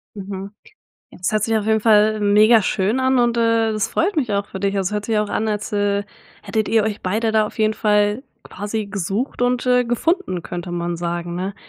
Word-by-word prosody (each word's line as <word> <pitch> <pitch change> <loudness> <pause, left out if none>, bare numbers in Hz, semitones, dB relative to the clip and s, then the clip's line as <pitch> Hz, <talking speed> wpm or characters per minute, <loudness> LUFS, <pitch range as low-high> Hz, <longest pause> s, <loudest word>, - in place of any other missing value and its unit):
Mhm, 195 0 -7 0.6
jetzt 180 - -3
hört 215 -1 +1
sich 225 0 +1
auf 215 - -1
jeden 220 0 +2
Fall 215 0 +4
megaschön 210 +1 +3
an 260 0 +2
und, 240 -1 +1
äh, 230 -1 +2
es 215 -1 -1
freut 370 +3 0
mich 250 -8 0
auch 200 0 -1
für 190 - -8
dich, 200 0 0
also 195 0 -1
hört 210 0 -2
sich 225 - -1
ja 210 - +2
auch 210 - -5
an 220 - -1
als, 210 0 -3
äh, 205 0 +1 0.4
hättet 220 -1 -2
ihr 225 -1 +3
euch 210 -1 -3
beide 220 +5 0
da 220 -1 +2
auf - - -11
jeden 215 0 +2
Fall 210 +3 +1 0.2
quasi 210 +2 -5
„gesucht 200 +6 -3
und, 245 0 +1
äh, 250 0 +3
gefunden“, 245 - -1
könnte 175 0 -6
man 175 0 -2
sagen, 170 0 -4
ne? 190 +2 -4
210 Hz, 215 wpm, -20 LUFS, 200-225 Hz, 0.6 s, Fall